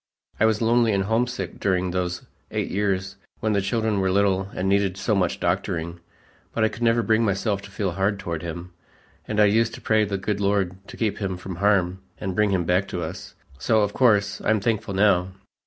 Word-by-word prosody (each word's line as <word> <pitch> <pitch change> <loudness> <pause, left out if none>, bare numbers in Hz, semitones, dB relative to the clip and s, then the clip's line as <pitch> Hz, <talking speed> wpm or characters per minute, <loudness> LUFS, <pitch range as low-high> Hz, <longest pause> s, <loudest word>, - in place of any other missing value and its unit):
I 110 - +4
was 110 0 +1
lonely 115 -1 +3
and 95 -1 +1
homesick 115 -2 -1
during 95 -2 0
those 90 -1 -2 0.3
eight - - -3
years 95 -1 -1 0.2
when 110 -1 0
the 100 - +2
children 110 0 0
were 95 0 +1
little 95 0 +2
and 90 - -1
needed 100 -1 +2
so 105 - 0
much 90 -4 0
doctoring, 85 0 -2 0.5
but 110 - 0
I 110 - +4
could 110 +2 -10
never 115 0 +3
bring 110 0 +2
myself 100 0 0
to 100 - -11
feel 100 -1 -2
hard 100 +4 0
toward 85 -4 -4
him, 85 +1 -6 0.6
and 105 - -1
I 105 - +7
used 115 +2 +2
to - - -10
pray 110 -1 +3
the 100 -1 -2
good 100 +1 -2
Lord 100 -2 +1
to - - -10
keep 110 -3 -1
him 95 -3 -2
from 95 -1 -7
harm 95 -2 +2 0.2
and 95 -1 -3
bring 105 +1 +3
him 95 -3 +1
back 90 +4 +1
to 85 - -4
us; 85 +4 -7 0.2
so, 110 - +2
of 105 0 0
course, 100 -5 +2
I'm 110 0 +2
thankful 105 -2 -1
now." 95 -2 +3
100 Hz, 210 wpm, -24 LUFS, 95-110 Hz, 0.6 s, I